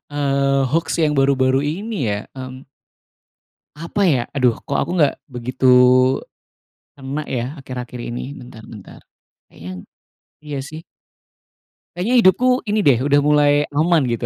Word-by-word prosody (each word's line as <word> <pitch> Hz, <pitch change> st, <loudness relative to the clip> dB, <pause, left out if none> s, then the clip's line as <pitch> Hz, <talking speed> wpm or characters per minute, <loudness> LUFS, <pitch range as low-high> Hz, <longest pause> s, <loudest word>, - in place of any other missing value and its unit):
eee, 140 Hz, -1 st, 0 dB
hoax 165 Hz, +2 st, 0 dB
yang 150 Hz, -, +1 dB
baru-baru 135 Hz, -1 st, +2 dB
ini 170 Hz, -, -3 dB
ya 100 Hz, -, -1 dB, 0.2 s
mmm, 130 Hz, 0 st, -8 dB, 1.1 s
Apa 165 Hz, +6 st, -4 dB
ya, 145 Hz, -9 st, +3 dB, 0.2 s
aduh, 125 Hz, -3 st, +3 dB
kok -, -, -2 dB
aku -, -, -3 dB
nggak 145 Hz, -4 st, +3 dB, 0.2 s
begitu 125 Hz, +2 st, -4 dB, 1.3 s
kena 140 Hz, +2 st, -5 dB
ya, 120 Hz, -, -1 dB, 0.2 s
akhir-akhir 125 Hz, -2 st, -7 dB
ini. 120 Hz, -, -5 dB, 0.2 s
Bentar 120 Hz, -3 st, -12 dB
bentar 105 Hz, -4 st, -12 dB, 0.5 s
kayaknya 90 Hz, +3 st, -10 dB, 0.7 s
iya 145 Hz, -2 st, -5 dB
sih. 155 Hz, +2 st, -10 dB, 1.1 s
Kayaknya 210 Hz, +8 st, 0 dB
hidupku 250 Hz, +7 st, +3 dB
ini 210 Hz, 0 st, 0 dB
deh, 135 Hz, -9 st, +3 dB
udah 145 Hz, 0 st, +3 dB
mulai 150 Hz, 0 st, +3 dB, 0.2 s
aman 160 Hz, +3 st, +2 dB
gitu. 120 Hz, 0 st, -2 dB
140 Hz, 130 wpm, -19 LUFS, 130-155 Hz, 1.3 s, ya